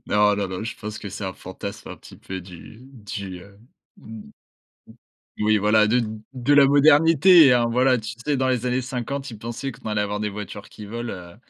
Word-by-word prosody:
Non 105 0 +3
non 100 -1 -1
non, 95 +3 -5
je 115 - -6
pense 105 0 -7
que 100 - -7
c'est 100 +1 -7
un 95 - -3
fantasme 95 +2 -8
un - - -8
petit - - -15
peu 95 -1 -7
du 90 +4 -13
du 100 -8 -8
heu 100 +1 -17 0.4
d 110 -1 -11 1.2
d - - -3
Oui, 110 0 +3
voilà, 105 +1 +3
de 120 +2 +2 0.3
de 130 +2 +1
la 140 -1 +7
modernité, 155 +1 +6
hein. 120 -1 +2
Voilà, 125 +1 +3
tu 110 0 -6
sais, 145 -2 0
dans 130 - 0
les 125 -1 0
années 125 +1 0
50, 135 +2 -5
ils 110 - -9
pensaient 120 +4 -5
qu'on 110 - -9
allait 105 -1 0
avoir 105 0 -3
des 105 0 -2
voitures 105 0 -8
qui 105 - -11
volent, 120 +3 -5
heu. 85 -1 -11
110 Hz, 215 wpm, -23 LUFS, 105-130 Hz, 1.2 s, la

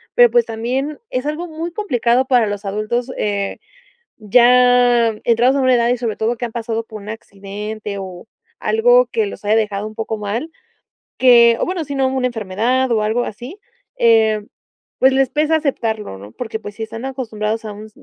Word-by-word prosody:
pero 485 -1 +6
pues 480 -1 +3
también 255 +6 -3
es 255 +2 -3
algo 305 +4 -3
muy 325 +2 -5
complicado 255 - +1
para 245 -5 +3
los 205 0 -4
adultos, 215 +5 -2
eh, 200 -1 -2 0.7
ya 245 +1 +5 0.2
entrados 240 +3 +3
a 275 - +1
una 255 -1 +4
edad 235 -1 +2
y 245 - +2
sobre 230 -3 -2
todo, 230 +2 -1
que 240 - -5
han 235 - -5
pasado 230 -1 -3
por 215 -2 -9
un 210 - -11
accidente 210 0 -7
o 185 +1 -9 0.3
algo - - +4
que 445 -2 0
los 400 - -9
haya 215 +2 +2
dejado 210 -2 -1
un 215 - -14
poco 220 0 -3
mal, 210 +9 -3 0.7
que 235 -2 +6
o - - 0
bueno, 355 -2 -3
sino 270 -2 0
una 260 -1 -1
enfermedad 235 +3 -1
o 220 -2 +2
algo 225 +3 0
así, 250 - -8 0.4
eh, 220 -2 +3 0.6
pues 265 0 +5
les 265 -1 +2
pesa 305 +3 +1
aceptarlo, 220 - -3
¿no?, 100 +2 -12
porque 220 -2 -5
pues 205 -2 -9
sí 225 - -10
están 225 +3 -7
acostumbrados 225 -4 -3
a 210 - -5
un 215 +1 -10
235 Hz, 185 wpm, -18 LUFS, 215-260 Hz, 0.7 s, pero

